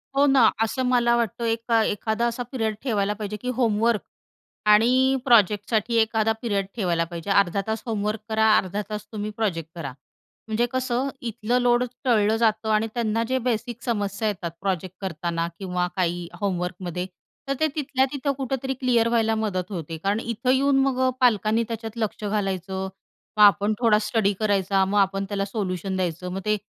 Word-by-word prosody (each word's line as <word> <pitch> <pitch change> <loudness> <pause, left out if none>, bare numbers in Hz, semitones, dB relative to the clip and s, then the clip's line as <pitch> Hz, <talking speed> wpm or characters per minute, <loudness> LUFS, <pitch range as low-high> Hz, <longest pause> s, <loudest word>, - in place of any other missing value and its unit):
हो 280 +1 +5
ना, 270 -5 +6 0.2
असं 225 +4 -1
मला 240 -1 +3
वाटतं, 235 0 -1
एका 230 0 +1
एखादा 220 +3 -1
असा 235 +1 -3
पिरियड 225 -5 -1
ठेवायला 210 -6 0
पाहिजे, 210 0 -5
की 250 +4 -5
होमवर्क 225 -2 +2 0.7
आणि 255 +5 +4
प्रोजेक्टसाठी 220 0 +3
एखादा 220 0 +1
पिरियड 205 -5 0
ठेवायला 175 -6 +1
पाहिजे. 170 +2 -7
अर्धा 200 -1 +3
तास 220 0 -2
होमवर्क 215 -1 -2
करा. 220 0 +2
अर्धा 200 +2 -1
तास 210 -1 -5
तुम्ही 210 -1 -4
प्रोजेक्ट 165 -7 -1
करा. 150 -6 -5 0.6
म्हणजे 220 +2 +1
कसं 255 +1 -1
इथलं 235 +1 -1
लोड 245 0 +3 0.2
टळलं 220 -4 +3
जातं 220 -1 +1
आणि 215 +1 +2
त्यांना 230 -1 0
जे 260 +1 +1
बेसिक 235 +1 -3
समस्या 205 -2 -1
येतात 175 -5 -3
प्रोजेक्ट 185 -2 -2
करताना 170 -2 -2
किंवा 180 -2 -1
काही 175 -1 -1
होमवर्कमध्ये, 180 -2 -2 0.4
तर 275 - +1
ते 315 - +3
तिथल्या 265 -3 +1
तिथं 280 0 -1
कुठेतरी 265 0 -2
क्लिअर 245 -3 +2
व्हायला 225 -1 +2
मदत 200 -4 -2
होते. 165 -3 -5
कारण 200 +6 0
इथं 235 +2 -3
येऊन 270 +1 +3
मग 265 -2 0
अ, - - +3
पालकांनी 220 -2 +3
त्याच्यात 225 0 -6
लक्ष 220 -1 -3
घालायचं, 190 -2 -2 0.5
मग 210 - +7
आपण 205 +1 +5
थोडा 225 -3 +4
स्टडी 210 -1 +1
करायचा, 195 -2 +2
मग 200 +2 -1
आपण 195 0 +1
त्याला 200 -1 -1
सोल्युशन 195 -2 -3
द्यायचं, 180 -1 -2
मग 195 - -4
ते 215 0 +2
215 Hz, 170 wpm, -24 LUFS, 195-235 Hz, 0.7 s, मग